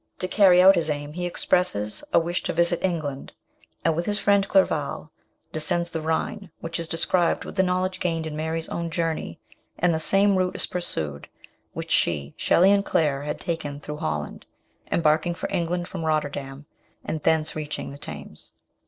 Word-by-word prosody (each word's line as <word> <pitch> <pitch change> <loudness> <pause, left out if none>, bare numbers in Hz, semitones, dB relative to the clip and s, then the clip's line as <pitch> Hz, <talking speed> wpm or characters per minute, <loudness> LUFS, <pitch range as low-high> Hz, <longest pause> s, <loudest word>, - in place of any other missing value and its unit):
To 185 - -2
carry 185 -2 +5
out 190 +1 +9
his 165 -4 +2
aim 145 0 -3
he 175 +1 -3
expresses 140 - +1
a - - +4
wish 170 +1 0
to - - -1
visit 170 0 +1
England, 155 -7 -3 0.5
and, 165 -1 +3
with 170 +2 -2
his 205 0 0
friend 200 -1 +3
Clerval, 160 -5 +1 0.4
descends 170 +2 +1
the 160 - -3
Rhine, 170 +5 -2
which 165 +1 -5
is 165 - -4
described 170 +1 +1
with - - -8
the 190 - +3
knowledge 185 0 0
gained 165 -3 -1
in 155 -1 -5
Mary's 160 +1 -2
own 170 0 -3
journey, 165 0 -3 0.4
and 175 0 +2
the 160 - 0
same 195 +4 +4
route 185 0 0
is - - +4
pursued 75 - -1 0.4
which - - -6
she, 75 -3 +1
Shelley, 185 +3 +4
and 200 0 +3
Claire 145 -7 +1
had 150 +1 -4
taken 145 -4 -4
through 150 0 -7
Holland, 75 - -4 0.4
embarking 160 +1 +2
for - - -4
England 175 +1 -1
from 175 -4 -6
Rotterdam, 145 -2 -2 0.4
and 155 - -3
thence 160 0 +1
reaching 150 -2 -5
the 140 - -10
Thames. 75 - -9
165 Hz, 180 wpm, -24 LUFS, 150-180 Hz, 0.5 s, out